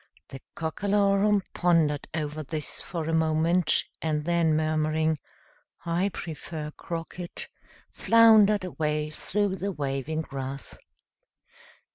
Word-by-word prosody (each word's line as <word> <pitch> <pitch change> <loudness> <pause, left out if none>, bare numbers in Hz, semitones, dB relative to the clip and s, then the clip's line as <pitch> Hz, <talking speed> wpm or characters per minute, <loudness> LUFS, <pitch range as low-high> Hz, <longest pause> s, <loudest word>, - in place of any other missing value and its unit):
The 135 - -9
Cockalorum 200 +4 +2
pondered 165 -5 +2
over 155 -1 -3
this 155 0 -4
for 165 -3 -4
a 165 - -1
moment, 160 +2 +2 0.2
and 150 -2 -1
then 170 -2 +2
murmuring, 155 0 +1 0.7
"I 170 +4 +1
prefer 155 -3 -6
croquet," 170 +2 -6 0.6
floundered 220 -3 +5
away 150 -4 -2
through 200 +4 -1
the 200 +2 -2
waving 145 0 -2
grass. 135 -2 -6
160 Hz, 100 wpm, -27 LUFS, 155-185 Hz, 0.7 s, floundered